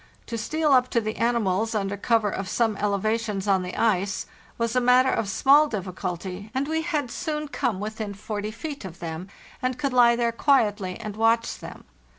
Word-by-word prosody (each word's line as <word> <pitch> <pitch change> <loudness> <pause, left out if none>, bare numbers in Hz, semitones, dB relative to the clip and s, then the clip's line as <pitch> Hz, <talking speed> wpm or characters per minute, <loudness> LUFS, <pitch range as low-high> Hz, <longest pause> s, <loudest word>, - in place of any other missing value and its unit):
To 235 - -5
steal 300 +7 0
up 255 -1 +5
to - - +7
the 215 -1 -4
animals, 225 -2 +1
under 200 -1 -1
cover 215 0 +1
of 190 0 -4
some 225 +1 +1
elevations 210 0 -1
on 195 -2 +3
the 180 0 -5
ice, 200 -3 +1 0.3
was 230 0 -1
a 250 - +3
matter 250 +1 +5
of 205 - -1
small 280 +8 +5
difficulty, 185 - -5
and 270 +2 0
we 320 +1 0
had 300 -6 -2
soon 300 +1 -3
come 230 -8 -1
within 215 0 -5
4o 210 +1 -4
feet 280 +4 -6
of 180 -3 -8
them, 165 +2 -6 0.3
and 255 0 -1
could 280 -3 -1
lie 240 -1 +6
there 235 -1 +1
quietly 210 -8 +1
and 210 -1 -6
watch 225 +1 +2
them. - - -10
225 Hz, 185 wpm, -25 LUFS, 200-250 Hz, 0.3 s, to